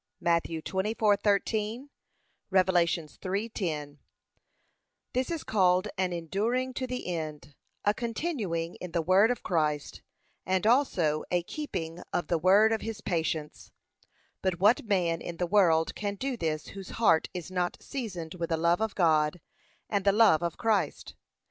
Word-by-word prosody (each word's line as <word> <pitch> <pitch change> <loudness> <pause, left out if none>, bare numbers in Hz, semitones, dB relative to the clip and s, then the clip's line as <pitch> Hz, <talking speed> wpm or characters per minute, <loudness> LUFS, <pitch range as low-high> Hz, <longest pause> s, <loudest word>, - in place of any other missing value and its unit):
(Matt. 170 -1 +2
24:13; 210 - 0 0.6
Rev. 190 -1 +4
3:10) 170 -2 -1 1.2
This 255 +1 0
is 335 -3 -3
called 185 -1 +2
an 185 -2 0
enduring 215 +10 -1
to 260 0 -3
the 250 0 -4
end, 155 -5 -5 0.3
a 205 - +4
continuing 220 - -3
in 180 -2 -8
the 170 - +1
word 190 +6 +5
of 245 - -2
Christ 150 -4 -1 0.4
and 185 +2 0
also 185 - +2
a 175 -1 +1
keeping 175 - -5
of 175 - -2
the 170 - +1
word 200 +6 +5
of 225 - 0
his 225 -2 -5
patience. 160 -4 -3 0.7
But 185 -2 -1
what 210 +6 +4
man 175 -6 +1
in 170 - -6
the 180 - 0
world 170 -4 +3
can 205 -1 -3
do 265 +5 -3
this 155 -7 -3
whose 195 -1 -9
heart 165 -8 +3
is 180 0 -6
not 180 -1 -1
seasoned 185 - -5
with 170 -2 -4
the 165 - +1
love 170 +4 +2
of 220 -2 -1
God 160 -2 +2 0.5
and 200 -2 0
the 200 - +5
love 205 -6 +5
of 170 -1 -2
Christ? 205 -9 0
185 Hz, 150 wpm, -29 LUFS, 165-215 Hz, 1.2 s, word